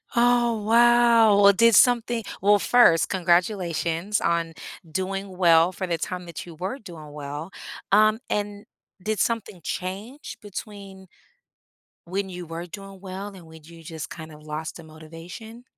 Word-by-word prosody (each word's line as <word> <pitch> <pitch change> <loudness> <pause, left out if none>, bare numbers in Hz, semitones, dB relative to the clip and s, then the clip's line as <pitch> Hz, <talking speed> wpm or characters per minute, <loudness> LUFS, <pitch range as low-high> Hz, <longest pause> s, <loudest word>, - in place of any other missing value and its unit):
Oh, 240 -2 +2
wow, 235 -1 +5
well, 200 0 +7
did 230 +2 +5
something 240 -2 +4 0.2
well, 205 +2 +5
first, 205 -7 +4
congratulations 175 0 0
on 170 -1 0 0.4
doing 190 +2 -4
well 170 -1 +5
for 185 +1 -4
the 170 -2 -2
time 180 +2 -5
that 170 +1 -8
you 165 - -10
were 190 - -5
doing 165 - -11
well, 150 +4 -7 0.4
um, 215 +2 +4
and 205 0 -3 0.4
did 215 -1 -2
something 225 -6 -2
change 205 +10 -6
between 200 -2 -9 1.0
when 190 +3 -3
you 180 -2 -8
were 165 +1 -6
doing 195 +2 -10
well 190 +1 -7
and 180 -3 -13
when 160 0 -14
you 165 +1 -14
just 160 -2 -7
kind 160 -1 -9
of 150 - -14
lost 155 +1 -6
the 165 - -12
motivation? 165 +9 -11
190 Hz, 150 wpm, -24 LUFS, 165-215 Hz, 1.0 s, well